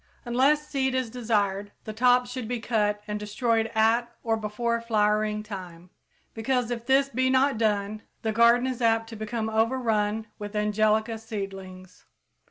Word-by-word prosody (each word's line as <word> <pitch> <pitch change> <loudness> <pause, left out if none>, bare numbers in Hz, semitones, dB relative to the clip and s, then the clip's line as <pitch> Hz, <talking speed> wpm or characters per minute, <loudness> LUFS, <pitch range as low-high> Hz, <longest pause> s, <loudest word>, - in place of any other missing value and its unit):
Unless 275 +5 +2
seed 265 -2 0
is 255 -3 -1
desired, 205 -4 -1
the 215 - -6
tops 245 +2 +3
should 250 -3 -5
be 245 0 -2
cut 210 -3 0
and 210 0 -3
destroyed 225 +2 0
at 230 +2 +2
or 225 -1 +1
before 230 +2 -2
flowering 210 -1 +1
time, 180 -4 -9 0.4
because, 245 +1 -1
if 235 0 -4
this 275 +1 +4
be 260 +1 +1
not 260 -2 +2
done, 210 -1 0 0.2
the 220 - 0
garden 235 +2 +5
is 255 -2 -3
apt 225 -1 +2
to 225 - -8
become 220 +1 -3
overrun 220 -2 0
with 205 0 -7
angelica 215 +1 +1
seedlings. 195 -4 -8
225 Hz, 155 wpm, -26 LUFS, 210-240 Hz, 0.4 s, garden